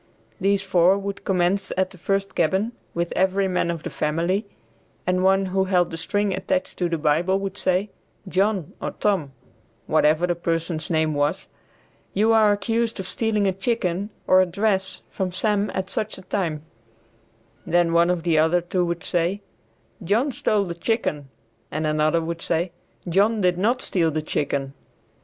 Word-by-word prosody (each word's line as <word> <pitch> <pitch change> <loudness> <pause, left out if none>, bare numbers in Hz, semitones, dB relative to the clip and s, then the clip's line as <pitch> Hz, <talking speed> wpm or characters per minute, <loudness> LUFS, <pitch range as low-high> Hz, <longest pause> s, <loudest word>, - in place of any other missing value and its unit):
These 200 +1 +2
four 185 0 +4
would 200 0 -5
commence 190 +1 +1
at 185 0 +1
the 185 - -14
first 195 +2 -1
cabin 190 +7 +1 0.2
with 170 0 -1
every 190 +1 +2
man 180 -2 0
of 165 -2 -3
the - - -5
family, 170 +7 -1 0.6
and 185 0 +1
one 195 +1 +4
who 190 0 +2
held 180 -2 +2
the - - -4
string 205 +4 0
attached 280 +7 -2
to 175 -2 +1
the 165 - 0
Bible 160 +5 +2
would 195 0 -4
say, 190 +1 0 0.4
"John 190 -2 0
or - - -3
Tom," 185 -10 +1 0.5
whatever 155 +2 +3
the 175 - +1
person's 165 -1 -2
name 160 -2 +1
was, 145 0 -1 0.7
"you 220 +3 +4
are 215 -2 +5
accused 225 +2 -1
of 190 - -4
stealing 220 -3 0
a 195 - +3
chicken 195 -2 -1 0.2
or 185 0 +6
a 185 - +2
dress 195 +1 -1
from 190 -2 -2
Sam 205 +2 0
at 190 0 -3
such 215 - -2
a 190 - -11
time," 170 -6 -2 1.0
then 175 -2 +2
one 170 +1 +4
of 180 -2 0
the 165 -3 +3
other 160 +3 +4
two 175 +1 -1
would 170 -1 -2
say, 175 +4 0 0.6
"John 225 - +1
stole 210 -4 +1
the 175 -3 -4
chicken," 165 - -2 0.4
and 155 +1 -2
another 155 +2 +2
would 165 0 -4
say, 170 +1 0 0.4
"John 205 +6 +3
did 180 -1 +2
not 240 +6 +1
steal 170 -4 +1
the 155 0 -2
chicken." 140 -2 -2
185 Hz, 170 wpm, -23 LUFS, 170-200 Hz, 1.0 s, or